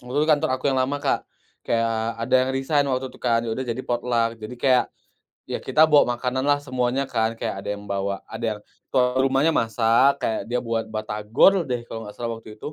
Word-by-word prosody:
waktu 125 +3 -7
itu 155 +2 +2
kantor 155 +1 +1
aku 130 - -16
yang 130 - +1
lama, 135 +3 0
Kak, 145 - -1 0.3
kayak 115 0 -1
ada 130 +2 0
yang 130 - 0
resign 145 +2 +1
waktu 130 0 -2
itu - - -17
kan 115 0 +1
ya 115 - -2
udah 130 +3 -3
jadi 115 +2 -2
potluck. 115 -2 -1
Jadi 110 +3 -7
kayak 130 0 +3 0.6
ya - - -2
kita 155 - +5
bawa 145 -5 +4
makananlah 130 +3 +1
semuanya 130 0 0
kan, 110 -1 0
kayak 105 - -3
ada - - -6
yang 100 - -11
bawa 100 0 -2
ada 115 - -6
yang - - -14 0.6
rumahnya 135 +4 +3
masak 115 +4 +3
kayak 110 -2 -1
dia 125 0 0
buat 115 -1 -2
batagor 110 - +2
deh 120 -1 -2
kalo 115 -1 -6
enggak 105 - -9
salah 115 -1 -3
waktu 110 -1 -12
itu. 150 - -6
120 Hz, 210 wpm, -23 LUFS, 115-135 Hz, 0.6 s, kita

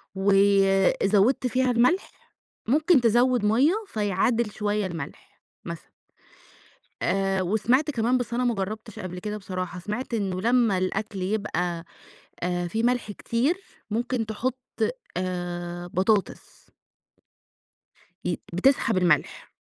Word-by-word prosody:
وزوّدت 195 +4 +3
فيها 255 0 +1
الملح، 250 +11 +2 0.6
ممكن 305 +2 +4
تزوّد 240 0 +3
مَيّة 255 - +4
فيعادل 210 +2 0
شوية 210 -1 -1
الملح، 165 -2 -9 0.2
مثلًا. - - -8 1.1
آآ 195 -1 +1
وسمعت 235 - +2
كمان 245 0 +1
بس 235 -1 -4
أنا 250 +1 +1
ما 240 -2 +2
جرّبتش 215 +2 -5
قبل 180 -1 -6
كده 210 +3 -4
بصراحة، 185 -3 -5
سمعت 210 +6 -4
إنه 190 -4 -1
لمّا 230 -3 +3
الأكل 195 +1 -2
يبقى 180 -4 -2 0.6
آآ 175 0 -1
في 225 +6 -2
ملح 245 -3 +1
كتير 245 - 0 0.4
ممكن 235 +1 -1
تحط 230 +4 -2 0.6
آآ 175 -1 -4
بطاطس. 190 +3 -1 1.5
ي 175 -2 -2
بتسحب 230 +2 +2
الملح. 170 -5 +1
210 Hz, 110 wpm, -25 LUFS, 185-240 Hz, 1.5 s, ممكن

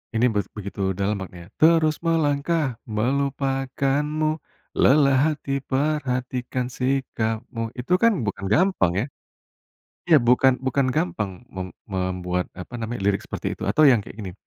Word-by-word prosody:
Ini 115 - +3
beg 100 -1 0
begitu 100 -1 -6 0.2
dalam 100 +1 0
maknanya 90 0 -9
"Terus 160 -1 +5
melangkah 150 -4 +1
melupakanmu, 140 +5 0 0.4
lelah 140 -1 +5 0.2
hati 140 -1 -3
perhatikan 130 -3 -1
sikapmu," 120 -3 -2
itu 130 +9 -1
kan 230 - +7
bukan 100 -1 -3
gampang 185 - +3
ya. 125 - -1 1.0
Ya 165 - +6
bukan 125 +2 +5
bukan 130 +1 +2
gampang 95 +3 -1 0.2
mem 95 -1 -6 0.2
membuat, 90 -1 -1
apa 90 +7 -9
namanya, 115 0 -4
lirik 100 - +1
seperti - - -5
itu - - -7
atau 155 - +3
yang 120 - +5
kayak 105 - -11
gini, 95 -3 -6
125 Hz, 135 wpm, -24 LUFS, 105-140 Hz, 1.0 s, kan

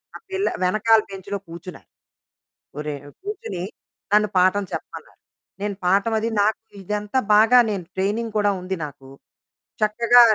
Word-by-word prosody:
ఆ - - -7
పిల్ల 385 +1 0 0.2
వెనకాల 215 +4 +4
బెంచ్‌లో 195 +1 -5
కూర్చున్నారు. 170 +1 -10 0.9
ఒరేయ్ 150 -2 -5 0.2
కూర్చొని, 390 - -5 0.5
నన్ను 210 0 +5
పాఠం 185 +2 +3
చెప్పమన్నారు. - - -8 0.4
నేను 205 -1 -2
పాఠం 195 +5 +3
అది 225 - -1
నాకు 215 +2 +1 0.2
ఇదంతా 210 +5 -2 0.2
బాగా 225 +4 +7
నేను 195 -4 -3
ట్రైనింగ్ 210 +4 -1
కూడా 205 -1 +3
ఉంది 185 +1 -3
నాకు, 135 -2 -13 0.7
చక్కగా 235 +3 +5
205 Hz, 130 wpm, -23 LUFS, 185-220 Hz, 0.9 s, బాగా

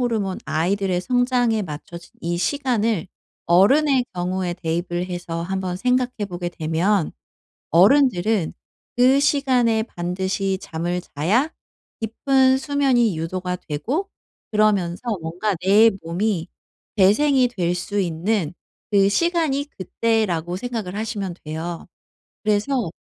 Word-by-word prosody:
호르몬 220 -6 -1
아이들의 185 +2 0
성장에 245 -1 +1
맞춰진 170 +1 -8
이 170 +1 -2
시간을 230 - 0 0.4
어른의 255 - +4
경우에 180 0 -2
대입을 175 +1 -2
해서 175 -2 -4
한번 185 0 -3
생각해 250 0 0
보게 175 -1 -4
되면 170 +3 0 0.6
어른들은 205 - +4 0.4
그 260 +3 +5
시간에 250 -6 +2
반드시 190 +1 -2
잠을 175 +2 -3
자야 215 - 0 0.5
깊은 260 +4 +2
수면이 265 - +2
유도가 180 +2 -3
되고 245 - -3 0.4
그러면서 200 -5 +2 0.2
뭔가 180 +6 -2
내 215 +4 +6
몸이 175 +1 -1 0.5
재생이 255 +6 +4
될 180 -6 -1
수 205 +3 -2
있는 175 0 -1 0.4
그 195 -1 +5
시간이 320 - +1
그때라고 185 -4 0
생각을 215 -4 -4
하시면 210 -5 -3
돼요. 160 +2 -5 0.6
그래서 215 -1 +1
195 Hz, 255 characters per minute, -22 LUFS, 175-245 Hz, 0.6 s, 내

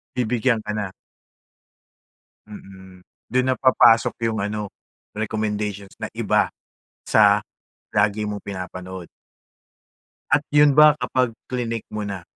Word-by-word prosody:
Bibigyan 120 -1 +1
ka 105 - -4
na. 100 -3 -4 1.5
Mm. 95 -3 -13 0.3
Dun 130 0 +2
na 130 - +2
papasok 120 -3 +4
yung 110 -2 -2
ano, 105 0 -3 0.5
recommendations 105 -2 -3
na - - -5
iba - - +1 0.5
sa - - +5 0.5
lagi 105 0 +1
mong 105 -1 -5
pinapanood. 90 -2 -7 1.2
At 145 +1 +3
yun 150 0 +6
ba 150 -1 +8
kapag 125 -1 0 0.2
klinick 115 -3 -3
mo 105 0 -4
na, 95 -3 -6
105 Hz, 110 wpm, -22 LUFS, 100-125 Hz, 1.5 s, ba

